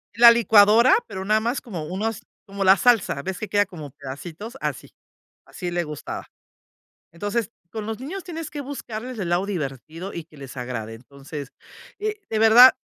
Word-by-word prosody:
la 235 0 +10
licuadora, 225 - +6
pero 190 0 -6
nada 215 +2 +3
más 235 +4 -1
como 180 -10 -6
unos, 215 +6 -3 0.2
como 200 -1 -4
la 190 +1 +7
salsa, 210 - +3
ves 190 -1 -4
que 215 - -4
queda 205 0 +3
como 155 -7 -9
pedacitos 160 - -8
así, - - -4 0.5
así 180 -2 -6
le 175 0 0
gustaba. 150 -2 -6 0.9
Entonces, 205 +6 -2 0.2
con 215 0 -5
los 225 +1 -4
niños 345 +8 -6
tienes 330 -4 -6
que 295 - -5
buscarles 250 -3 -6
el 180 -4 -2
lado 175 +3 +1
divertido 165 - -5
y 170 - -5
que 155 -1 -20
les 135 -1 -10
agrade. 120 -3 -5
Entonces, 140 +3 -9 0.5
eh, 425 0 -3
de 220 - 0
verdad, 225 +4 +9
200 Hz, 175 wpm, -24 LUFS, 160-235 Hz, 0.9 s, la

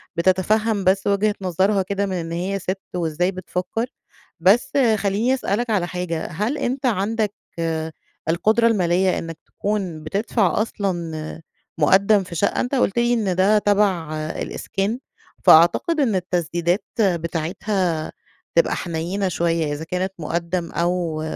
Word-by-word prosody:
بتتفهم 200 +4 +2
بس 190 +1 +2
وجهة 205 +1 +2
نظرها 190 +2 +1
كده 200 +2 -1
من 190 - -3
إن 165 -2 -3
هي 185 +4 -2
سِت 190 +1 -3 0.2
وإزاي 175 +2 0
بتفكر. 185 +4 -3 0.5
بس 205 +11 +4 0.3
خلّيني 205 +6 +1
أسألَك 240 -2 -1
على 190 -5 +1
حاجة، 175 -3 -3
هل 210 - -2
أنتَ 265 -1 -2
عندَك 215 -1 0 1.0
القدرة 220 +7 +3
المالية 185 -3 +2
إنّك 165 -1 -7
تكون 190 -7 -3
بتدفع 200 +4 +1
أصلًا 170 -7 -3 0.4
مقدم 195 +6 +4
في 175 -2 -9
شقة، 200 - +1
أنتَ 250 +3 -1
قُلت 240 -4 +1
لي 240 0 +3
إن 205 -6 0
ده 195 +3 +4
تبع 200 -6 +1 0.2
الإسكان، 200 +6 -3 0.4
فأعتقد 175 - +5
إن 235 -8 +2
التسديدات 175 0 0
بتاعتها 170 -1 0 0.4
تبقى 170 - +3
حنينة 175 +4 -2
شوية، 165 -3 0
إذا 145 - -5
كانت 180 +3 -2
مُقدم 170 +2 -2
أو 170 -1 -1
185 Hz, 130 wpm, -22 LUFS, 170-210 Hz, 1.0 s, فأعتقد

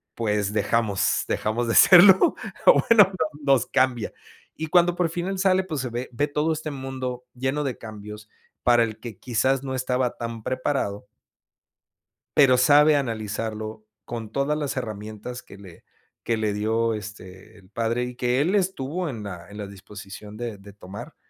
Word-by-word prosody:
pues, 105 -3 -1
dejamos 110 -3 +1
dejamos 115 +3 -1
de 115 - 0
serlo, 190 +1 +8 0.3
o - - +7
bueno, 210 -4 +7 0.3
nos 135 -4 +3
cambia. 125 -4 0 0.4
Y 160 - -4
cuando 175 +1 +3
por 175 -2 0
fin 175 +1 -4
él 195 -1 -3
sale, 190 0 +3
pues, 155 -7 -4
se 130 - -4
ve 120 +2 -5
ve 145 +5 0
todo 150 +2 0
este 155 0 -5
mundo 130 -2 -5
lleno 130 +4 -2
de 135 -3 -3
cambios 105 -1 -10 0.3
para 120 -1 +5
el 110 -1 -4
que 115 -4 -8
quizás 130 +3 0
no 130 -1 -4
estaba 125 -1 -1
tan 115 -1 -6
preparado 130 -6 -2 1.3
pero 130 -3 +6
sabe 150 +3 +6
analizarlo 110 -3 -4 0.2
con 115 -2 -6
todas 140 +2 0
las 145 -3 -3
herramientas 110 +1 -6
que 100 - -14
le 95 -4 -14 0.4
que 115 - 0
le 110 -1 -1
dio 110 +2 0
este, 105 0 -10
el 95 -2 -20
padre 115 +3 -1
y 125 0 -5
que 125 +2 +1
él 175 +6 +1
estuvo 180 -4 -1
en 110 -5 -6
la 90 -2 -8
en 105 - -11
la 105 - -5
disposición 100 +1 -11
de 115 -3 -5
de 100 0 -14
tomar. 100 0 -10
120 Hz, 170 wpm, -24 LUFS, 105-140 Hz, 1.3 s, serlo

